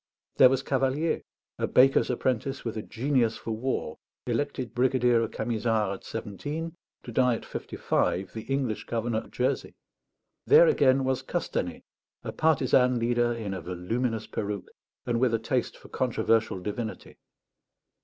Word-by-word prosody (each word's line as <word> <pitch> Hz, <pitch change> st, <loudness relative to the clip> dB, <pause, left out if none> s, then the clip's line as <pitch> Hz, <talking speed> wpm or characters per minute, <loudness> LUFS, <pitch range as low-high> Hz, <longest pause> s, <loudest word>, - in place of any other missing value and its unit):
There 130 Hz, -, +8 dB
was 135 Hz, 0 st, 0 dB
Cavalier, 135 Hz, +5 st, 0 dB, 0.4 s
a -, -, +1 dB
baker's 135 Hz, +2 st, +4 dB
apprentice 125 Hz, +1 st, -1 dB
with 115 Hz, -, -3 dB
a 110 Hz, -, -3 dB
genius 120 Hz, -1 st, 0 dB
for 115 Hz, -, -6 dB
war, 110 Hz, -7 st, -2 dB, 0.3 s
elected 125 Hz, 0 st, -2 dB
brigadier 125 Hz, -1 st, +3 dB
of 115 Hz, -, -1 dB
Camisards 110 Hz, -2 st, 0 dB
at 95 Hz, -, -9 dB
seventeen, 150 Hz, -, -5 dB, 0.3 s
to 120 Hz, -, -8 dB
die 125 Hz, +1 st, +3 dB
at -, -, -8 dB
fifty -, -, -7 dB
five 95 Hz, +1 st, 0 dB
the 110 Hz, -, -5 dB
English 130 Hz, -6 st, -1 dB
Governor 115 Hz, -1 st, -1 dB
of -, -, -12 dB
Jersey. 130 Hz, +2 st, -1 dB, 0.7 s
There 470 Hz, +3 st, +8 dB
again 135 Hz, -, +4 dB
was 130 Hz, -1 st, 0 dB
Castanet, -, -, -3 dB, 0.4 s
a -, -, -4 dB
partisan 130 Hz, -5 st, +3 dB
leader 120 Hz, 0 st, +1 dB
in 110 Hz, -4 st, -4 dB
a 95 Hz, -, -5 dB
voluminous 110 Hz, +7 st, -2 dB
peruke 100 Hz, -3 st, -4 dB, 0.3 s
and 120 Hz, -1 st, 0 dB
with 125 Hz, -2 st, +3 dB
a -, -, +2 dB
taste 120 Hz, +2 st, -1 dB
for -, -, -15 dB
controversial 115 Hz, -5 st, +1 dB
divinity. 105 Hz, +4 st, -6 dB
120 Hz, 150 wpm, -27 LUFS, 110-130 Hz, 0.7 s, There